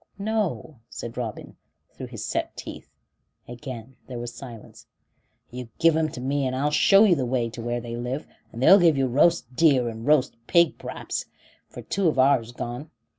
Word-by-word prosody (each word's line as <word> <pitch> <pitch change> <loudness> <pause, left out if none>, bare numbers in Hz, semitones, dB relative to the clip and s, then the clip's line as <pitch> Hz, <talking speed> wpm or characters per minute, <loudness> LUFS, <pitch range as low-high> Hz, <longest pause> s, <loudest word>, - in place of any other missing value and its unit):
"No," 200 - -2
said 115 0 -7
Robin, 115 -4 -6 0.4
through - - -8
his - - -7
set - - -3
teeth; - - -9 0.6
and 120 - -8
again 125 -1 -9
there 125 - -6
was 120 0 -6
silence. 120 -5 -11 0.6
"You 125 -1 -7
give 165 -1 +4
'em 160 -1 +1
to - - -7
me, 135 +1 -1
and 130 - -2
I'll 145 +3 0
show 195 +7 +6
you 205 -5 +5
the 140 -6 0
way 120 -2 -1
to 120 - -8
where 120 +1 -2
they 115 0 -6
live 125 +5 -4 0.3
and 120 +2 -5
they'll 195 +8 +8
give 165 -5 +4
you 135 - +2
roast 130 0 +2
deer 135 -5 +4
and 115 +2 -8
roast 145 -5 +3
pig 170 -2 +3
p'raps, - - -5 0.4
for - - -10
two 195 -2 0
of 155 - +1
ourn's 130 -3 +3
gone. 125 +4 -6
130 Hz, 190 wpm, -25 LUFS, 120-155 Hz, 0.6 s, they'll